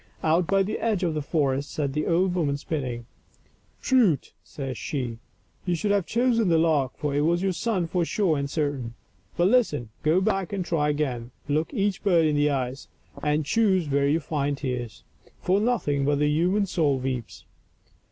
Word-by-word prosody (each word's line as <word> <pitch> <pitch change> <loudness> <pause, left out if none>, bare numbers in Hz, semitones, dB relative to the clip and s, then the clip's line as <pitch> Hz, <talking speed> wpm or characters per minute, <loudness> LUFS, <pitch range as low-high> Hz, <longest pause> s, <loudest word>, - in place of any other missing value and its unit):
Out 165 +2 +2
by 195 0 +3
the 200 - -3
edge 215 -5 0
of 170 -3 +1
the 155 - -2
forest 140 -2 0
sat 140 -3 -2
the 150 +1 -1
old 180 +2 +2
woman 150 -6 0
spinning. 130 -6 -4 0.4
" - - -37
Prut 225 - +3
!*' - - -44
says 135 -3 -6
she, 120 -3 -4 0.2
" - - -39
you 175 - +2
should 200 +5 -1
have 200 -4 +1
chosen 235 -2 +2
the 165 - +4
lark, 155 -5 +1
for 150 -2 -2
it 145 - +1
was 170 +4 +1
your 195 - +2
son 190 0 -1
for 175 +1 0
sure 175 -1 +1
and 140 -1 -2
certain. 140 -6 -2 0.4
But 175 +1 +4
listen; 150 - +2
go 155 +4 +3
back 195 -2 -1
and 190 -3 -2
try 150 -4 +1
again; 130 -6 -2 0.2
look 150 +2 0
each 205 -4 -1
bird 175 -5 +3
in 150 -1 +2
the 145 0 +3
eyes, 130 -1 -3 0.3
and 150 0 0
choose 190 -4 +2
where 140 0 +2
you 155 +3 +2
find 145 -3 -2
tears; 125 -5 -4 0.4
for 190 +2 +2
nothing 205 - 0
but 145 +1 +2
the 150 +1 +2
human 180 +7 +2
soul 155 -7 +1
weeps." 130 -2 -5
155 Hz, 195 wpm, -25 LUFS, 140-185 Hz, 0.4 s, the